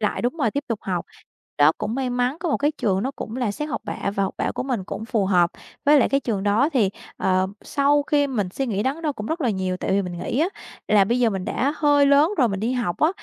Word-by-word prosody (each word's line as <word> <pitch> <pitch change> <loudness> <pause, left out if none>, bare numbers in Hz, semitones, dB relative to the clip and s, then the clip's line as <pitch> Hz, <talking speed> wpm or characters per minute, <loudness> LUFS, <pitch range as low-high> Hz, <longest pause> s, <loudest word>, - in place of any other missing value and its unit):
Lại, 210 - -1
đúng 245 +7 -1
rồi, 245 -8 +1
tiếp 285 +6 -3
tục 230 -3 -1
học. 180 -3 -3 0.5
Đó, 145 +2 +6
cũng 215 - -3
may 260 -1 -1
mắn, 245 +3 0
có 345 - -2
một - - +2
cái 295 +2 +1
trường 195 -9 0
nó 260 - -1
cũng 245 -4 -7
là 245 -5 0
xét 300 +8 -4
học 300 - -3
bạ - - -3
và 195 - +2
học 190 - -2
bạ - - -1
của - - -2
mình 250 -7 -2
cũng 215 - -6
phù 225 -4 0
hợp. 175 -3 +3 0.3
Với 295 0 +6
lại - - +3
cái 275 - +2
trường 215 -7 -2
đó 210 +8 +3
thì, 220 -8 +2 0.3
ờ, 185 0 +1 0.2
sau 290 +1 +2
khi 290 0 +2
mình 215 -9 -2
suy 270 - -2
nghĩ 205 -4 -1
đắn 275 +7 -2
đo 300 -3 0
cũng 210 -4 -7
rất 325 +6 -2
là 250 -6 +1
nhiều, 185 -2 -2
tại - - -3
vì 200 +1 +2
mình 180 -2 -6
nghĩ 245 - -1
á, 335 - +3 0.4
là 205 -2 +5
bây 235 +5 0
giờ 235 -2 +4
mình 190 -3 -3
đã 275 +8 0
hơi 290 -1 +4
lớn 285 +4 +5
rồi 250 -5 +4
mình 195 -1 -3
đi 230 +4 0
học 240 -9 -2
á, 310 - +5
240 Hz, 285 wpm, -23 LUFS, 195-280 Hz, 0.5 s, Đó